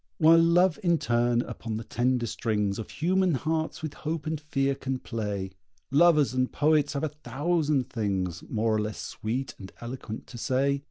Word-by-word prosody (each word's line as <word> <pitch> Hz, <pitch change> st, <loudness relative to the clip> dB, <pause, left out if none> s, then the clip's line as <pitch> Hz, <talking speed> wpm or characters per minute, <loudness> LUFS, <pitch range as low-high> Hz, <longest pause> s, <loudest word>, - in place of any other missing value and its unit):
While 165 Hz, 0 st, +7 dB
Love 175 Hz, +2 st, +4 dB
in 170 Hz, -3 st, +3 dB
turn 120 Hz, -2 st, +1 dB
upon 110 Hz, -2 st, -5 dB
the 115 Hz, -, -5 dB
tender 120 Hz, +2 st, 0 dB
strings 105 Hz, -3 st, -1 dB
Of 110 Hz, -, -6 dB
human 185 Hz, 0 st, +1 dB
hearts 160 Hz, +4 st, -2 dB
with 155 Hz, -2 st, -3 dB
hope 155 Hz, -1 st, -4 dB
and 155 Hz, -1 st, -2 dB
fear 140 Hz, -2 st, 0 dB
can 135 Hz, -1 st, -3 dB
play, 105 Hz, -6 st, -4 dB, 0.4 s
Lovers 150 Hz, -2 st, +5 dB
and 130 Hz, 0 st, 0 dB
poets 150 Hz, -1 st, +2 dB
have 140 Hz, -, -2 dB
a 155 Hz, -, +1 dB
thousand 150 Hz, -1 st, 0 dB
things, 95 Hz, -6 st, -2 dB
More 110 Hz, 0 st, +1 dB
or 110 Hz, -, +2 dB
less 105 Hz, 0 st, -4 dB
sweet 125 Hz, +5 st, -4 dB
and 95 Hz, -, -9 dB
eloquent, 120 Hz, -2 st, -6 dB
to 120 Hz, -, -10 dB
say. 140 Hz, +3 st, +1 dB
135 Hz, 175 wpm, -27 LUFS, 115-155 Hz, 0.4 s, While